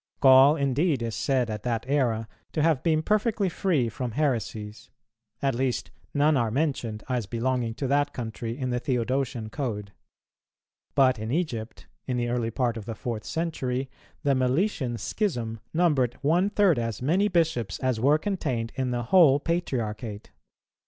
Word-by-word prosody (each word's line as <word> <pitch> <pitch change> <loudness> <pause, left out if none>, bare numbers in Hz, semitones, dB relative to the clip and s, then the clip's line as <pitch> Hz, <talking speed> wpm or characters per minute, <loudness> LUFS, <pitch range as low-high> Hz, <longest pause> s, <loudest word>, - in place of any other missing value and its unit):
Gaul 135 +2 +7
indeed 140 0 +1
is 115 -1 -3
said 130 -4 +1
at 105 -1 -4
that 115 0 -2
era 120 -6 +1 0.3
to 155 - +1
have 160 -5 +3
been 160 -1 +1
perfectly 210 0 +1
free 165 - +1
from 120 0 -4
heresies; 110 -6 -2 0.5
at 135 -1 +2
least 130 +1 -1 0.2
none 150 +1 +3
are 120 -4 +1
mentioned 120 -5 -1
as 125 -5 -1
belonging 120 0 -1
to 135 - -3
that 145 +2 +2
country 115 0 -5
in 130 -2 -2
the 125 - 0
Theodosian 125 -2 -1
Code. 105 -7 -4 1.0
But 130 -4 +4
in 110 +2 -4
Egypt, 125 -9 -3 0.2
in 125 -2 -1
the 120 -1 -1
early 120 -1 0
part 120 0 -1
of 110 - -7
the 115 -1 -5
fourth 110 -1 -4
century, 135 -6 -2 0.3
the 140 - +3
Meletian 130 - 0
schism 120 - -2
numbered 150 -8 +2
one 175 +7 +3
third 195 -9 +3
as 115 -3 -3
many 180 +9 +3
bishops 160 - 0
as 130 -3 -1
were 140 +6 +4
contained 145 - -2
in 130 -1 -2
the 120 -1 -1
whole 145 0 +6
Patriarchate. 120 - -3
130 Hz, 160 wpm, -26 LUFS, 115-150 Hz, 1.0 s, Gaul